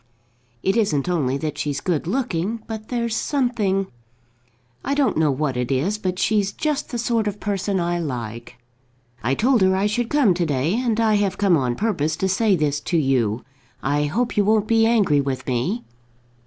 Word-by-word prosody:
"It 195 - +2
isn't 160 -11 +1
only 140 -7 0
that 150 +2 -4
she's 145 -1 -2
good 165 -2 -1
looking, 220 -1 -2
but 220 -1 -7
there's 235 -2 -1
something, 225 -9 0 1.0
I 280 - -1
don't 285 -2 +2
know 155 -1 +2
what 135 -1 -1
it 125 +1 -2
is, 175 +11 0
but 185 -2 -2
she's 205 -1 +1
just 300 +3 -2
the 240 - -3
sort 230 -2 0
of 205 0 -3
person 200 -1 -1
I 175 0 0
like. 120 -5 -5 0.6
I 130 +4 0
told 245 - +3
her 190 0 +4
I 195 +2 +1
should 230 +3 0
come 275 -10 +4
to 175 0 0
day, 145 +4 0
and 230 -1 0
I 220 -2 +3
have 200 -2 0
come 195 -4 +3
on 125 -5 0
purpose 160 - 0
to 190 - -1
say 195 +2 +2
this 145 -3 0
to 170 +4 -1
you. 125 -7 +1 0.4
I 145 +2 +1
hope 230 +11 -1
you 205 - +3
won't 215 0 +3
be 225 0 +3
angry 200 -11 +3
with 135 -2 -3
me." 140 - -1
190 Hz, 190 wpm, -22 LUFS, 145-220 Hz, 1.0 s, her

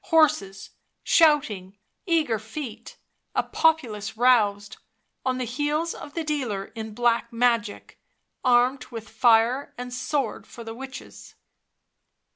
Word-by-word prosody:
Horses, 240 - +2 0.3
shouting, 215 - +3 0.3
eager 310 - +2
feet; 225 +2 -8 0.4
a - - +2
populace 230 -11 0
roused, 210 -5 +3 0.5
on 255 -1 0
the 255 - -2
heels 295 +7 -1
of 290 - -10
the 330 - -1
dealer 250 -11 -3
in 220 -1 -7
black 235 0 +1
magic, 230 -3 -1 0.4
armed 250 +1 +3
with 230 -1 -8
fire 230 +4 +3
and 250 0 -6
sword 255 -1 -2
for 235 - -10
the 225 0 -7
witches. 265 +3 -10
245 Hz, 115 wpm, -25 LUFS, 220-285 Hz, 0.5 s, shouting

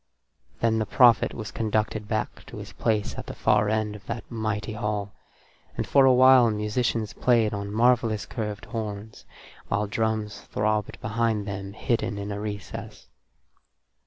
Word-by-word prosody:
Then 110 -1 +2
the 110 - -1
prophet 120 -3 +5
was 110 -2 -6
conducted 110 -1 -1
back 110 -1 -3
to - - -9
his - - -9
place 105 -2 0
at - - -8
the - - -6
far 105 -1 +2
end 110 -1 0
of 105 - -11
that 115 - -4
mighty 110 -1 -2
hall, 105 -2 -3 0.6
and - - -1
for 140 -1 +5
a 130 - +6
while 130 -1 +7
musicians 110 +1 -1
played 115 -4 +2
on 100 0 -4
marvellous 115 -1 +2
curved 105 -1 -5
horns, 110 -2 -6 0.4
while 100 +1 0
drums 110 0 -2
throbbed 105 0 -1
behind 110 -1 0
them 100 0 -5
hidden 115 -2 -1
in 100 0 -4
a 100 - -4
recess. 105 -4 -7
110 Hz, 155 wpm, -26 LUFS, 105-115 Hz, 0.6 s, while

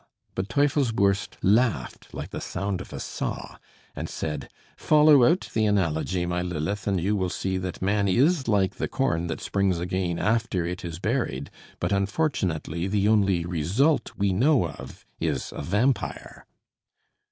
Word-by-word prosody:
But 95 +2 -3
Teufelsbürst 115 -9 +1
laughed 105 - +1
like - - -7
the - - -5
sound 100 -2 -3
of - - -10
a - - -6
saw, - - -5 0.4
and - - -4
said: 75 -3 -4 0.3
"Follow 150 -3 +5
out 170 +6 +1
the 110 -1 +2
analogy, 90 -2 0
my 90 0 -1
Lilith, 90 +4 -3
and 95 -2 +1
you 100 +5 +1
will 95 -2 0
see 95 +1 -2
that 90 0 -5
man 100 +1 +2
is 135 - +3
like 100 -3 +1
the - - -1
corn 85 -11 0
that 80 - -4
springs 100 -3 +1
again 90 0 -2
after 110 -5 0
it 90 +2 -4
is 85 -2 -5
buried; 100 - -2 0.3
but - - -1
unfortunately 100 - -1
the 100 0 +1
only 100 -5 +3
result 105 - +1
we 100 -2 +1
know 125 - +3
of - - -11
is - - -2
a - - -4
vampire." 115 +7 -1
100 Hz, 155 wpm, -26 LUFS, 90-115 Hz, 0.4 s, Follow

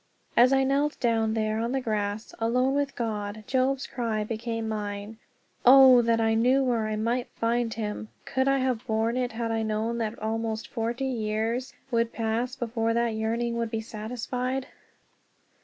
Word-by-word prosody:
As 245 +2 +6
I 270 0 +4
knelt 280 +2 +1
down 225 -2 +1
there 215 0 0
on 235 +2 -1
the 270 - +1
grass, 215 -2 -2
alone 250 +4 +2
with 285 0 -1
God, 215 -2 -3
Job's 265 +1 +1
cry 225 -4 -2
became 225 +1 -3
mine, 210 0 -4 0.4
"Oh, 260 -1 +9
that 230 -1 +2
I 225 0 +2
knew 250 +4 +3
where 235 -4 +1
I 215 - -2
might 235 +3 -1
find 230 0 0
him!" 215 -1 -4 0.2
Could 260 0 0
I 275 0 +4
have 255 -2 -1
borne 225 +1 +1
it 250 -2 -1
had 230 0 -2
I 225 0 0
known 220 +2 -1
then 220 -1 -1
that - - -17
almost 220 0 -2
forty 235 +3 -2
years 230 0 -2 0.2
would 230 -1 +1
pass 230 +3 -1
before 230 -2 -1
that 235 0 +2
yearning 230 +2 -1
would 230 -1 -1
be 220 0 -2
satisfied? 250 +4 -3
230 Hz, 175 wpm, -27 LUFS, 220-250 Hz, 0.4 s, Oh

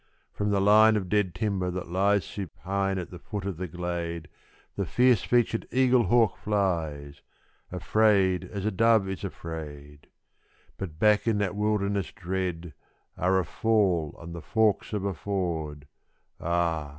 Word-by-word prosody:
From 105 0 -1
the 100 -1 +2
line 110 +2 +6
of 95 -4 -2
dead 100 -3 +1
timber 100 -5 -1
that 90 -1 -5
lies 100 +2 +2
supine 95 0 -3
at 90 - -5
the 90 - -9
foot 100 +1 -6
of 100 -5 -3
the 90 +1 -4
glade, 85 -1 -4 0.5
The - - -2
fierce 125 -2 +4
featured 120 -2 +1
eaglehawk 120 -4 +3
flies 80 -9 -2 0.5
afraid 100 -4 +2
as 100 +2 -6
a 110 - +1
dove 110 0 +3
is 95 -4 -5
afraid; 75 -3 -8 0.7
But 85 -5 -6
back 105 +4 +3
in 110 -2 +2
that 100 0 -1
wilderness 100 -2 0
dread 90 -3 -4 0.4
are 95 +2 +2
a 95 - +1
fall 95 -6 +1
and 85 0 -9
the 85 - -7
forks 110 +1 +1
of 105 -2 -2
a 100 - -1
ford 80 -6 -3 0.5
_Ah! 85 -3 0
95 Hz, 150 wpm, -27 LUFS, 85-105 Hz, 0.7 s, line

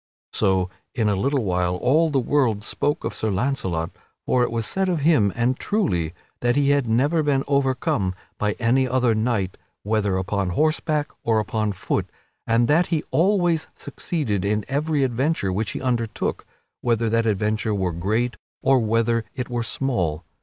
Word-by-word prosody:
So 95 -1 +2 0.3
in 110 -4 +2
a 100 - +2
little 135 +6 0
while 90 -2 0
all 150 - +3
the 145 - 0
world 120 -5 +1
spoke 145 +6 -1
of - - -3
Sir 110 - -2
Launcelot, 95 -6 -1 0.3
for 125 - +2
it 120 - +2
was 115 -1 -2
said 190 - 0
of 170 -4 0
him, 140 -10 +4
and 125 +2 +1
truly, 90 - 0 0.2
that 120 0 +1
he 140 0 +3
had 140 -5 +1
never 145 +8 +2
been 140 -3 +1
overcome 130 -9 +1 0.2
by 105 0 +1
any 125 +4 +2
other 125 -2 +2
knight, 110 -4 -1 0.3
whether 105 -2 +1
upon 95 0 -1
horseback 155 -1 +1
or 115 -1 +2
upon 110 0 -1
foot, - - -2 0.4
and 115 +1 +3
that 165 +4 +3
he 160 -3 0
always 175 -2 +2
succeeded 115 - -3
in 105 +1 0
every 145 +1 0
adventure 130 - 0
which 105 +2 -1
he - - -4
undertook, 120 -3 -2 0.3
whether 115 -1 +1
that 115 +1 +1
adventure 110 +1 0
were 95 -3 -1
great 110 +8 -1 0.3
or 135 -1 +5
whether 115 +1 +1
it 125 -2 -4
were 120 -1 -1
small. 90 - -2
115 Hz, 165 wpm, -23 LUFS, 105-140 Hz, 0.4 s, or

